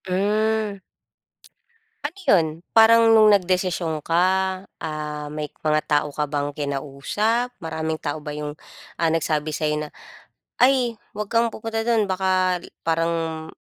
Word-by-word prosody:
Hmm. 210 Hz, +2 st, 0 dB, 1.2 s
Ano 305 Hz, +6 st, -6 dB
'yon? 180 Hz, -, +4 dB, 0.3 s
Parang 225 Hz, 0 st, +6 dB
nung 220 Hz, -1 st, +7 dB
nagdesisyon 180 Hz, -5 st, +1 dB
ka, 165 Hz, +2 st, -2 dB, 0.6 s
ah, 150 Hz, -2 st, -5 dB
may 150 Hz, 0 st, -5 dB
mga 155 Hz, 0 st, +1 dB
tao 150 Hz, 0 st, +1 dB
ka 150 Hz, -, 0 dB
bang 145 Hz, -1 st, -2 dB
kinausap? 150 Hz, -, -1 dB
Maraming 160 Hz, -1 st, -3 dB
tao 150 Hz, +1 st, -4 dB
ba 150 Hz, -, -5 dB
yung, 150 Hz, 0 st, -5 dB, 0.4 s
ah, 165 Hz, -1 st, +1 dB
nagsabi 155 Hz, -1 st, 0 dB
sa'yo 150 Hz, 0 st, -1 dB
na, 150 Hz, -, -7 dB, 0.7 s
"Ay, 250 Hz, -2 st, +4 dB, 0.2 s
huwag 210 Hz, 0 st, -3 dB
kang 230 Hz, 0 st, +3 dB
pupunta 225 Hz, 0 st, -3 dB
do'n. 225 Hz, -3 st, +2 dB
Baka 185 Hz, -1 st, +1 dB
i -, -, -11 dB, 0.2 s
parang, 165 Hz, -1 st, -1 dB
170 Hz, 130 wpm, -23 LUFS, 150-215 Hz, 1.2 s, nung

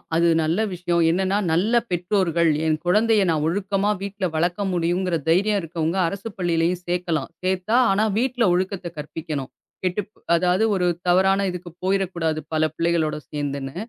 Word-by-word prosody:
அது 170 Hz, +1 st, +3 dB, 0.2 s
நல்ல 165 Hz, +6 st, 0 dB
விஷியம். 175 Hz, -1 st, 0 dB
என்னன்னா, 190 Hz, +3 st, +1 dB, 0.2 s
நல்ல 200 Hz, +8 st, +1 dB, 0.2 s
பெற்றோர்கள், 175 Hz, -2 st, +1 dB, 0.2 s
என் 155 Hz, -1 st, +2 dB
குழந்தையை 210 Hz, +3 st, +3 dB
நான் 155 Hz, -2 st, +1 dB
ஒழுக்கமா 195 Hz, +2 st, 0 dB
வீட்ல 200 Hz, 0 st, -3 dB
வளக்க 175 Hz, +4 st, 0 dB
முடியும்ங்கிற 175 Hz, +1 st, 0 dB
தைரியம் 200 Hz, +5 st, +3 dB
இருக்கவங்க, 165 Hz, +2 st, -2 dB
அரசு 200 Hz, +5 st, -5 dB
பள்ளியிலேயும் 175 Hz, 0 st, 0 dB
சேக்கலாம். 175 Hz, -3 st, -1 dB
சேத்தா, 185 Hz, +4 st, 0 dB, 0.2 s
ஆனா, 205 Hz, +3 st, +2 dB
விட்டுல 245 Hz, -2 st, +1 dB
ஒழுக்கத்த 185 Hz, 0 st, -1 dB
கற்பிக்கணும். 150 Hz, -2 st, -5 dB, 0.3 s
கெட்டுப் 185 Hz, +3 st, -2 dB, 0.2 s
அதாவது, 180 Hz, +4 st, +2 dB
ஒரு 180 Hz, -2 st, +1 dB, 0.2 s
தவறான 190 Hz, +2 st, +3 dB
இதுக்குப் 175 Hz, -1 st, -9 dB
போயிற 195 Hz, +1 st, +2 dB
கூடாது, 160 Hz, -2 st, -1 dB
பல 155 Hz, 0 st, +2 dB
பிள்ளைகளோட 165 Hz, -2 st, 0 dB
சேந்துனு. 140 Hz, -2 st, -4 dB
180 Hz, 145 wpm, -23 LUFS, 165-195 Hz, 0.3 s, அது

